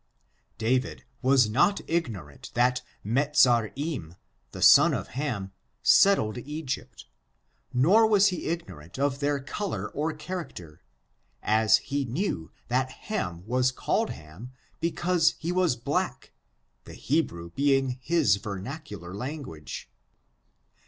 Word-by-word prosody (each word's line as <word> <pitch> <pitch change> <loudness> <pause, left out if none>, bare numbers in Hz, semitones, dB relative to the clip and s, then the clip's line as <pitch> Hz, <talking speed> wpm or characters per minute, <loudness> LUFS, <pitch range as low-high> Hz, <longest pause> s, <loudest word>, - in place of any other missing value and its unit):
David 110 - 0 0.2
was 130 -3 +4
not 140 - +2
ignorant 110 - -3
that 125 +1 +2 0.2
Mezarim, 130 - +1 0.4
the - - -8
son - - +7
of - - -5
Ham, 120 -9 -3 0.3
settled 125 - +4
Egypt, 145 -1 -6 0.7
nor 190 - +5
was 205 -2 +5
he 180 - -4
ignorant 130 - -6
of 140 0 0
their 145 0 0
color 185 +9 -4
or 155 +3 -1
character, 150 - -7 0.6
as 110 0 +4
he 140 +1 -3
knew 130 - -3 0.2
that 130 +1 0 0.2
Ham 90 - -3
was 125 +2 +1
called - - -1
Ham 90 +12 -10 0.3
because 170 0 +1
he 170 +2 -3
was 180 -7 +2
black, 115 - -2 0.5
the - - -10
Hebrew 85 - -1
being 135 +1 +1
his 145 - +3
vernacular 100 - -7
tongue. 125 - -6
130 Hz, 110 wpm, -27 LUFS, 105-155 Hz, 0.7 s, son